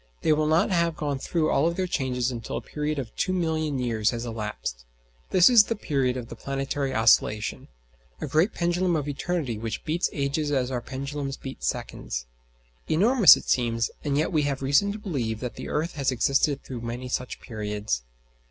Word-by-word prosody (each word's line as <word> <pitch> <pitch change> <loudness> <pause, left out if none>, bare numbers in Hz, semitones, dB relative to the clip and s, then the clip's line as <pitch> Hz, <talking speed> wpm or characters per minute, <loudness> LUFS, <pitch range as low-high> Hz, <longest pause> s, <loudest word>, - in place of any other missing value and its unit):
They 155 - +4
will 150 0 +1
not 160 +5 +3
have 170 -2 +2
gone 145 -4 -2
through 155 +2 0
all 155 +4 +3
their 185 +2 -1
changes 130 -6 -1
until 115 -3 -5
a - - -4
period 150 0 -3
of 130 -5 -5
2,000,000 160 -6 0
years 110 -3 +1
has 120 0 -3
elapsed. 105 - -5 0.5
This 180 -2 +6
is 235 -4 +7
the 230 - -2
period 135 - 0
of 120 -2 -6
the - - -8
planetary 135 0 -2
oscillation: 110 -2 +2 0.5
"a - - -3
great 160 +7 +2
pendulum 175 +1 +1
of 150 -2 -1
eternity 145 -5 -2
which 110 -1 -4
beats 165 +3 0
ages 145 +2 -1
as 130 -2 0
our 125 -2 -2
pendulums 140 +1 -5
beat 135 - -9
seconds." - - -3 0.6
Enormous 215 +5 +7
it - - -10
seems; 115 -2 +1
and 145 -1 0
yet 155 - +1
we 155 -3 +2
have 140 -2 -2
reason 145 +10 +3
to 205 - -5
believe 130 - -3
that 125 0 -4
the - - -7
earth 160 +3 -1
has 135 -2 0
existed 135 +3 +1
through 125 -3 -7
many 120 +2 -5
such 125 0 -3
periods. 105 - -3
140 Hz, 185 wpm, -26 LUFS, 120-160 Hz, 0.6 s, is